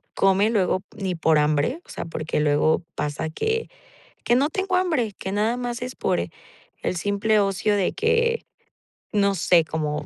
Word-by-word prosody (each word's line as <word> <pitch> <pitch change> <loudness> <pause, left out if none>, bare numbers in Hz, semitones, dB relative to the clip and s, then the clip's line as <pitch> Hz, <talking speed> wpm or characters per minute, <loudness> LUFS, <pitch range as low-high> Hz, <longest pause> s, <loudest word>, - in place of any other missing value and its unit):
come, 195 +2 +3
luego, 185 -3 +1
ni 190 -4 -2
por 160 -1 +3
hambre, 150 - +1
o - - -24
sea, - - -5
porque 160 -1 -3
luego 150 +2 +2
pasa 150 +2 -2
que 445 - -2 0.6
que 240 - +4
no 280 +4 +3
tengo 385 -1 -1
hambre, 310 - 0
que 190 - -4
nada 220 +4 +1
más 245 -1 -4
es 250 +1 -5
por - - 0 0.6
el - - -1
simple 205 +4 +1
ocio 200 +1 +1
de 195 -3 +1
que, 465 +1 +1 0.7
no 200 -1 +2
sé, 175 -1 +4
cómo 150 -2 -3
200 Hz, 165 wpm, -24 LUFS, 165-245 Hz, 0.7 s, que